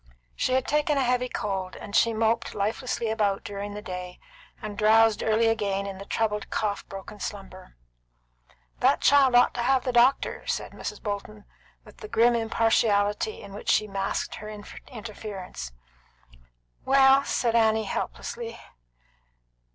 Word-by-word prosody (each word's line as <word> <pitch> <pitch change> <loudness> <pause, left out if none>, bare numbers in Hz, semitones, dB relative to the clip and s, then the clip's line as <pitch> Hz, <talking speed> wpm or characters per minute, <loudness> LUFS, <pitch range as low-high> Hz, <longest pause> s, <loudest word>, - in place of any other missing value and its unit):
She 255 - 0
had 260 0 +2
taken 300 0 +1
a 270 - +2
heavy 250 0 +1
cold, 190 -4 -3
and 205 - -7
she 230 - +4
moped 225 +1 0
lifelessly 220 +2 -2
about 205 -3 0
during 205 0 -6
the 210 - -7
day, 180 -1 -7 0.4
and 210 -1 -6
drowsed 220 +1 +4
early 225 +1 +2
again 200 -3 0
in 195 -1 -6
the 200 - -8
troubled 210 -2 -1
cough 210 -2 -2
broken 195 +2 -9
slumber. 190 - -8 1.0
"That - - +3
child 275 -3 +5
ought 245 - +5
to 240 - -3
have 260 +1 +2
the 255 - -1
doctor," 245 +3 +2
said - - -2
Mrs. - - -7
Bolton, 205 0 -5 0.4
with - - -16
the 430 - -9
grim 240 - +4
impartiality 225 - +1
in 200 - -10
which 205 - -6
she 215 - +3
masked 195 -1 -2
her 215 - -7
interference. 205 - -8 1.1
"Well," 270 0 +5
said 235 -4 0
Annie 220 -1 +3
helplessly. 230 +3 -5
220 Hz, 145 wpm, -26 LUFS, 200-240 Hz, 1.1 s, child